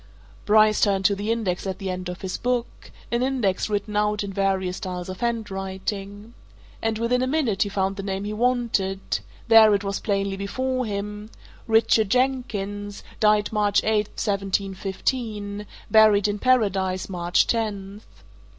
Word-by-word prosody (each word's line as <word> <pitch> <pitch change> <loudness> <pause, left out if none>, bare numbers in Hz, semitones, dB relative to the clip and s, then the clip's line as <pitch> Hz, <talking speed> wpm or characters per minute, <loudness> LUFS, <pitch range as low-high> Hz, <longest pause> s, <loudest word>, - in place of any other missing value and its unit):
Bryce 215 0 +4
turned 195 -2 +2
to 200 - +4
the 205 +3 -2
index 200 -5 -1
at 190 - -3
the 195 -2 -4
end 180 0 -5
of 180 - -7
his 190 -1 -3
book 245 -1 -3 0.2
an 235 0 +1
index 245 -8 0
written 210 0 -2
out 210 0 +1
in 200 -1 -5
various 190 -2 0
styles 180 -3 -5
of 185 - -6
handwriting. 205 -1 -4 0.5
And 225 -1 0
within 235 +2 +1
a 255 - +1
minute 260 -9 0
he 205 - +2
found 195 0 -1
the - - -3
name 195 0 -3
he 210 +1 -4
wanted 220 -5 0 0.3
there 220 -2 +7
it 200 - -2
was 195 0 -2
plainly 200 -2 -1
before 255 +5 -2
him 210 +1 -5 0.4
Richard 220 -2 +3
Jenkins, 205 -5 -1 0.2
died 210 0 +3
March 205 -1 +2
8th, 210 -1 0
1715: 200 +2 -2 0.2
buried, 215 -2 +6
in 205 0 -2
Paradise, 195 -7 +1
March 175 -2 +1
10th. 205 -3 -2
205 Hz, 150 wpm, -24 LUFS, 195-220 Hz, 0.5 s, there